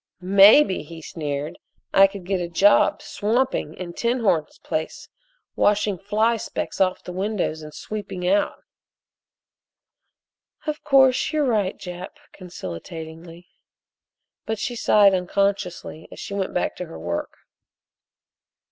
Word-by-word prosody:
"Maybe," 195 +5 +6
he 165 +2 -10
sneered, 150 -2 -5 0.3
"I 195 0 +7
could 195 -2 -10
get 190 -1 -1
a 170 - -4
job 200 +4 +4
swamping 225 - -1
in 175 -1 -7
'Tinhorn's' 230 -10 0
place 155 0 -4 0.5
washing 205 -2 +2
fly 215 +4 +1
specks 210 - -4
off 185 -1 +1
the - - -7
windows 190 -4 -2
and 155 0 -9
sweeping 185 +1 -5
out." 200 +2 +1 2.0
"Of 305 -1 -4
course, 265 -1 +4
you're 305 -2 +1
right, 210 -6 0
Jap," 180 0 -8 0.2
conciliatingly, 165 - -9 1.0
but 220 0 -1
she 240 +4 -3
sighed 205 -3 +5
unconsciously 180 -3 -2
as - - -11
she - - -6
went 195 -1 -2
back 180 - -1
to 180 - -5
her - - -10
work. 85 +1 -4
190 Hz, 120 wpm, -23 LUFS, 170-210 Hz, 2.0 s, I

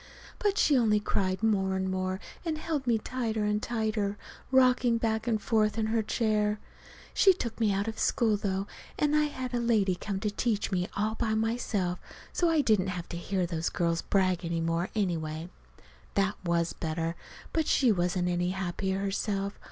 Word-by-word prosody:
But 410 -1 +1
she 295 - +4
only 220 -4 +4
cried 195 -1 -1
more 195 -3 +2
and 190 0 -1
more, 185 0 -1 0.2
and 325 -3 -2
held 305 -4 -3
me 235 -2 +4
tighter 225 -2 -2
and 210 0 +1
tighter, 215 -3 -1 0.3
rocking 255 -2 +4
back 225 0 -1
and 225 -2 +2
forth 215 0 +1
in 220 - +1
her 230 - +3
chair. 210 -1 +1 0.5
She 385 - +6
took 235 -11 -5
me 220 -3 +3
out 200 +2 0
of 220 0 -4
school, 225 -3 +2
though, 195 -1 -1 0.3
and 295 0 +2
had 290 -4 0
a 240 - +1
lady 220 -5 +2
come 190 +2 -4
to 210 -1 0
teach 210 -1 -1
me 180 -1 0
all 215 +2 +1
by 220 -1 -1
myself, 220 -5 -1 0.3
so 345 - +2
I 320 -2 +4
didn't 210 -7 +2
have 180 -2 -4
to - - -5
hear 185 +1 -1
those 165 -1 -2
girls 170 -1 0
brag 185 -2 +1
any 170 0 -1
more, 165 +2 0
anyway. 165 -4 -2 0.6
That 195 0 +2
was 170 -1 +1
better. 165 0 -2 0.4
But 320 -2 +1
she 255 -4 +4
wasn't 180 -1 +1
any 175 0 0
happier 190 +1 -2
herself. 200 0 -2
210 Hz, 180 wpm, -29 LUFS, 185-230 Hz, 0.6 s, She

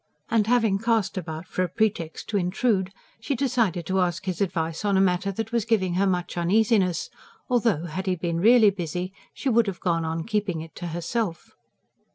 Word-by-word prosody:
And 220 -2 +3
having 225 -5 +3
cast 225 -3 +1
about 160 -3 -5
for 185 - -2
a 180 - 0
pretext 180 -4 -1
to 210 - +1
intrude, 190 +1 0 0.3
she 225 +5 -2
decided 235 - 0
to 190 +3 0
ask 175 0 -1
his 185 -2 -3
advice 165 -2 -1
on 200 -2 +2
a - - +4
matter 190 +1 +2
that 225 +3 -4
was 235 -2 +1
giving 200 -5 +1
her 195 +3 +2
much 180 -2 -1
uneasiness; 190 -2 +2 0.4
though, 230 -9 +1
had 185 +4 -5
he 185 - +2
been 170 -1 -2
REALLY 220 +1 +6
busy, 180 0 -4 0.2
she 275 - -3
would 235 -2 +3
have 190 -3 -4
gone 170 -2 0
on 160 0 -2
keeping 205 -6 -1
it 160 0 -10
to 175 - -5
herself. 170 +2 -3
190 Hz, 195 wpm, -25 LUFS, 175-220 Hz, 0.4 s, REALLY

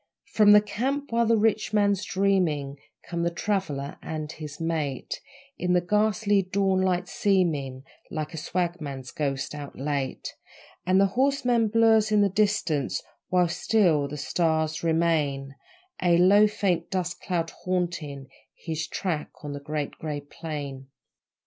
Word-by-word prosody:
From 210 -1 +5
the 210 - +8
camp, 265 +7 -2
while 230 0 +2
the 230 0 +4
rich 215 0 +1
man's 205 -2 +2
dreaming, 175 -9 0 0.3
Come 170 -1 -3
the 170 - +2
'traveller' 170 -7 -2
and 155 -1 -5
his 150 -2 -8
mate, 155 -5 -2 0.4
In 180 0 +1
the 180 - +5
ghastly 205 +2 +2
dawnlight 185 -1 +1
seeming 160 -10 0 0.3
Like 155 +2 -4
a - - -6
swagman's 155 -6 -3
ghost 135 -2 -2
out 145 -1 -8
late; 140 -1 -3 0.5
And 185 +1 +4
the 195 - +6
horseman 250 -3 +2
blurs 220 -1 +4
in 210 -1 +4
the 200 - +4
distance, 195 -8 0 0.3
While 180 -1 +3
still 170 -7 +2
the 150 - -6
stars 160 0 0
remain, 155 -5 +1 0.5
A 175 -2 +4
low, 200 +4 +6
faint 180 -5 -1
dust 180 -2 -3
cloud 170 -3 -2
haunting 170 -7 -3 0.3
His 160 -2 -4
track 165 -3 -3
on 145 -1 -5
the 145 - -5
Great 150 0 -3
Grey 150 -2 -4
Plain. 145 -3 -7
175 Hz, 140 wpm, -26 LUFS, 150-200 Hz, 0.5 s, the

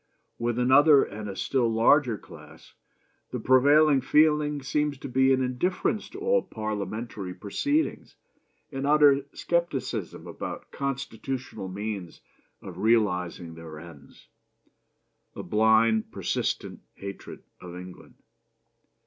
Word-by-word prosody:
With 120 0 -1
another 135 +4 +6
and 105 0 -7
a 100 - -6
still 120 +2 0
larger 115 +1 +3
class - - -15 0.6
the - - -4
prevailing 140 +2 +5
feeling 150 0 +2
seems 150 +1 -1
to 135 - -8
be 130 +1 +3
an 130 0 +2
indifference 180 - -1
to 390 - -9
all 480 +3 +2
Parliamentary 110 -2 -5
proceedings; 285 - -2 0.6
an 135 0 -3
utter 145 -2 +5
scepticism 135 - -2
about - - -7
constitutional 130 -4 -5
means 100 -2 -6 0.4
of 90 -1 -9
realizing 90 -6 0
their 80 -1 -10
ends; 75 -4 -15 1.1
a - - -6
blind, 110 +1 +3
persistent - - -3 0.2
hatred 100 0 -9 0.2
of 90 -1 -10
England. 90 0 -11
120 Hz, 110 wpm, -26 LUFS, 100-145 Hz, 1.1 s, another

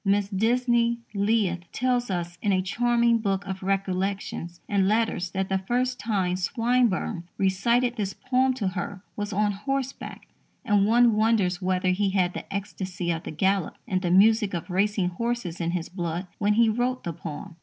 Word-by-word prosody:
Mrs. 200 0 +1
Disney 235 +2 +2 0.2
Leith 200 -4 0
tells 245 -1 0
us 175 -1 -3
in 205 - +1
a 185 -1 +2
charming 235 +3 +2
book 200 -2 -1
of 190 -1 -5
recollections 190 -2 -2
and 195 -2 +2
letters 215 -4 +1
that 190 +1 -2
the 190 0 0
first 250 +5 -1
time 195 -4 0
Swinburne 230 -4 0
recited 235 +6 +1
this 200 -3 -1
poem 255 0 +1
to 205 -7 -1
her 185 +1 -5
was 205 0 -3
on 205 +1 +1
horseback, 270 +6 -4 0.4
and 205 -1 +3
one 235 0 +5
wonders 210 -4 +2
whether 185 0 +1
he 195 +2 +1
had 185 -2 +1
the - - -8
ecstasy 190 -3 -3
of 165 -1 -2
the - - -4
gallop 190 +3 0
and 185 -5 0
the 180 - -1
music 210 +2 +4
of 170 +2 -5
racing 195 0 +1
horses 200 -3 -3
in 170 - 0
his 170 -1 -2
blood 175 0 -4
when 210 0 +3
he 230 +1 +5
wrote 245 +3 0
the 170 - -3
poem. 160 +1 -8
200 Hz, 175 wpm, -26 LUFS, 185-230 Hz, 0.4 s, one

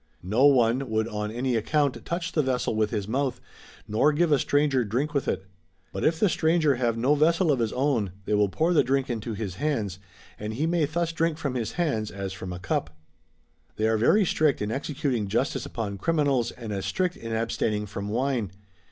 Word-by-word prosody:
No 110 +10 +4
one 130 -1 +3
would 110 0 0
on 105 -1 -3
any 120 +3 -1
account 140 +5 0
touch 170 +1 -3
the 155 - +2
vessel 130 -4 -1
with 110 -1 +1
his 105 -3 -3
mouth, 130 +2 -1 0.5
nor 110 +8 +3
give 160 +2 +1
a 145 - +5
stranger 145 -3 +2
drink 125 +8 -1
with 140 - -1
it. 95 0 -1 0.5
But 95 - -3
if 160 +1 +2
the 210 - +4
stranger 160 -5 +2
have 120 -2 0
no 130 +5 +3
vessel 165 +3 +3
of 135 - +1
his 115 -2 0
own 125 -8 0
they - - -1
will 105 -1 +3
pour 160 - +1
the 155 - +5
drink 135 +1 0
into 115 -1 -4
his 100 -4 -5
hands 110 -11 -1 0.4
and 105 +1 -4
he 145 +6 0
may 165 -1 +2
thus 165 +3 -1
drink 165 -1 0
from 140 -5 -3
his 115 -4 -3
hands 140 -12 -1
as 95 -1 -5
from 95 0 -7
a 90 - -5
cup.] 85 -3 -3 0.8
They 110 - +1
are 110 - +2
very 195 - +4
strict 155 -4 +2
in 105 +1 -2
executing 135 -5 -2
justice 115 +7 -1
upon 100 -4 -4
criminals, 140 -5 +1
and 115 -4 -7
as 95 -1 -3
strict 180 -1 0
in 115 - -7
abstaining 110 -2 -1
from 100 0 -5
wine. 120 -2 0
125 Hz, 205 wpm, -26 LUFS, 110-150 Hz, 0.8 s, a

